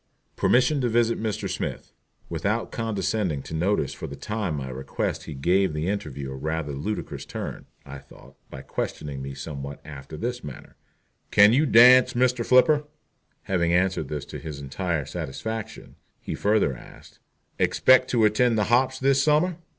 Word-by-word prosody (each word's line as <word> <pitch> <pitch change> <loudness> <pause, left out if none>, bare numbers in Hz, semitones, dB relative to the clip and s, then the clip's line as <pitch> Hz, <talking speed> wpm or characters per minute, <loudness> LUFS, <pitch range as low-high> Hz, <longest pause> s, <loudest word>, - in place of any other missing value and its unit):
"Permission 130 +3 +3
to 125 - +1
visit 115 0 +1
Mr. 110 -3 -2
Smith." - - -5 0.4
Without 100 +8 -2
condescending 105 - -2
to - - -9
notice 85 -3 0
for - - -7
the - - -8
time 105 -7 -3
my 70 -2 -5
request 65 +1 -4
he 75 - -7
gave 90 +5 +1
the 75 +2 -2
interview 70 -9 -4
a - - -6
rather 80 +2 -3
ludicrous 95 +10 -4
turn, - - -7 0.2
I 70 0 -9
thought, - - -17 0.2
by 65 - -9
questioning 70 -2 -5
me 70 0 -6
somewhat 70 -2 -7
after 70 0 -9
this 120 +4 -4
manner: 70 -3 -10 0.5
"Can 105 +2 +6
you 150 +5 +3
dance, 125 +1 +7
Mr. 125 -1 +2
Flipper?" 145 +5 +4 0.6
Having 85 -3 0
answered 90 -4 +1
this 75 -1 -5
to - - -8
his 75 -3 -7
entire 75 +2 -3
satisfaction, 110 - -6 0.2
he - - -6
further 100 -10 +1
asked: - - -15 0.4
"Expect 130 0 +4
to 115 -3 +3
attend 115 +2 +3
the 105 - +2
hops 130 +1 +3
this 135 +1 +2
summer?" 155 +4 +2
100 Hz, 160 wpm, -25 LUFS, 75-120 Hz, 0.6 s, dance